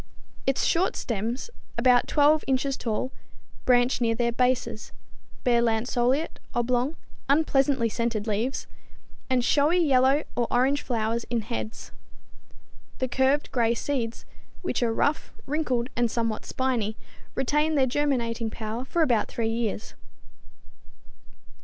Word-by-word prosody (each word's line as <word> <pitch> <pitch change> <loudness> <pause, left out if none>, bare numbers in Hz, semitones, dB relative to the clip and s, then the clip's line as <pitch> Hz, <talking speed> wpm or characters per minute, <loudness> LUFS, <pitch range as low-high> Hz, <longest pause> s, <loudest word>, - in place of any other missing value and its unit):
Its 270 - +2
short 350 +3 +2
stems, 230 - -3 0.3
about 245 0 +4
12 300 +1 +4
inches 270 +1 +1
tall, 235 +2 -2 0.5
branch 245 0 +3
near 230 -1 +2
their 235 0 +1
bases, 250 -2 0 0.5
bear 240 -1 +3
lanceolate, 240 +5 0 0.2
oblong, 245 +5 +1 0.3
unpleasantly 275 -4 +3
scented 230 -1 -2
leaves, 225 +5 -1 0.6
and 250 -2 +2
showy 295 +6 +3
yellow 275 -3 +4
or 240 -1 +1
orange 270 +4 +2
flowers 230 -1 -1
in 235 -1 0
heads. 225 0 -6 1.1
The 260 - -1
curved, 265 +3 +1
gray 235 -2 +2
seeds, 235 -4 -3 0.4
which - - -1
are 235 -2 +2
rough, 285 +6 0
wrinkled 265 -5 -1
and 240 0 +2
somewhat 230 -2 -2
spiny, 235 -5 -1 0.4
retain 300 +4 +1
their 270 -2 +4
germinating 245 -4 0
power 220 +2 -5
for 335 +5 +1
about 240 -8 +2
three 225 -1 -2
years. 225 -2 -2
245 Hz, 120 wpm, -26 LUFS, 230-270 Hz, 1.1 s, about